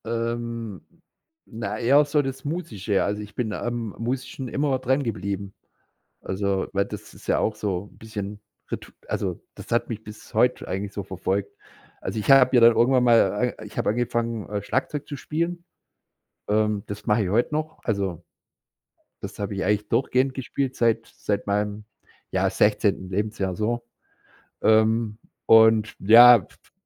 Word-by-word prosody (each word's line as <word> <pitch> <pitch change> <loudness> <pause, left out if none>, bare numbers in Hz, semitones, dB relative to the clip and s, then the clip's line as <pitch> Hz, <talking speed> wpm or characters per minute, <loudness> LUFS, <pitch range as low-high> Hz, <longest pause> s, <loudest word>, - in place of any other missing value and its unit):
Ähm, 115 -2 -3 0.6
na, 110 -3 -5
eher 140 +5 +5
so 145 +1 +2
das 135 -1 -6
Musische. 115 - -1
Also, 105 +1 -2
ich 105 0 -11
bin 110 -4 -2
am 120 -1 -3
Musischen 130 +2 -4
immer 140 0 0
drangeblieben. 100 -7 -2 0.7
Also, 95 0 -2
weil 100 0 +1
das - - -9
ist - - -15
ja - - +2
auch 110 - 0
so 100 -1 -3
bisschen 105 -2 -7 0.3
Ritu - - -6 0.2
also, - - -2
das - - -11
hat 120 - +1
mich 110 -2 -6
bis 105 +2 -12
heute 125 +3 +2
eigentlich 100 +1 -3
so 100 - -4
verfolgt. 95 +1 -3 0.5
Also, - - -4
ich 105 - -1
habe 130 -1 +7
ja - - +7
dann 115 0 +7
irgendwann 125 +2 +4
mal 115 0 +3
äh, - - -9
ich 105 - -10
habe - - +1
angefangen, 115 -1 -2
äh, 105 -1 -3
Schlagzeug 135 +7 -2
zu 145 - -5
spielen. 170 +4 -3 0.8
Ähm, 105 -1 +1
das 100 0 -7
mache 105 +1 +2
ich 90 - -2
heute 120 +8 +1
noch. 155 +1 -3
Also, 95 -6 -2 1.0
das - - -8
habe 100 0 -3
ich 95 - -2
eigentlich 105 +1 0
durchgehend 130 +3 +1
gespielt 135 0 -3
seit 115 -2 +1
seit 105 -1 -2
meinem, 105 +1 -1 0.5
ja, - - +1
16. 95 - +1
Lebensjahr 100 -1 -2
so. 120 +4 -1 0.8
Ähm, 110 0 +3 0.3
und 110 -1 +5
ja, 120 +4 +9
f 95 - -10
f - - -27
110 Hz, 160 wpm, -24 LUFS, 105-125 Hz, 1.0 s, ja